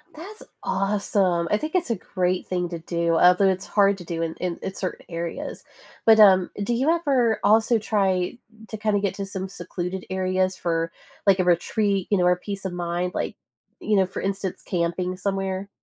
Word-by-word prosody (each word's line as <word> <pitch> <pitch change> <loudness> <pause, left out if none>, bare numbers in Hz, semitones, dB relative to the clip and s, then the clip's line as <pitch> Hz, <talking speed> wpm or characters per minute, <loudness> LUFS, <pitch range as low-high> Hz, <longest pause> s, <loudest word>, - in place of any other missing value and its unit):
That's 390 +8 -9 0.2
awesome. 195 -3 +1
I 210 - +4
think 310 - -5
that's 360 -6 +1
a - - +2
great 185 -1 -2
thing 180 -1 -1
to 170 -1 -5
do, 170 0 0
although 180 +3 +5
it's 190 0 -1
hard 200 -1 +3
to - - -8
do 165 -1 -4
in 165 -1 -2
in 180 -2 -3
in 190 - -4
certain 185 - -5
areas. 170 -1 -5 0.4
But, 220 -1 +7
um, 190 -4 +7
do 240 +4 0
you 265 +6 +1
ever 275 -9 +2
also 220 +2 +4
try 195 -2 0 0.3
to 220 - -5
kinda 215 -1 +1
get 200 -2 -1
to 200 - -4
some 195 -1 -4
secluded 180 0 -5
areas 185 0 0
for, 165 -1 -1 0.4
like, 195 -1 +5
a - - +4
retreat, 195 +2 +1
you 205 - +3
know, 180 - +2
or 180 0 +5
peace 195 +1 -6
of 185 - -3
mind, 175 +1 -2
like, - - -3 0.4
you 215 - 0
know, 190 -1 +4
for 185 - -6
instance, 195 -1 -3
camping 180 +1 -1
somewhere? 195 0 -2
190 Hz, 195 wpm, -24 LUFS, 180-205 Hz, 0.4 s, But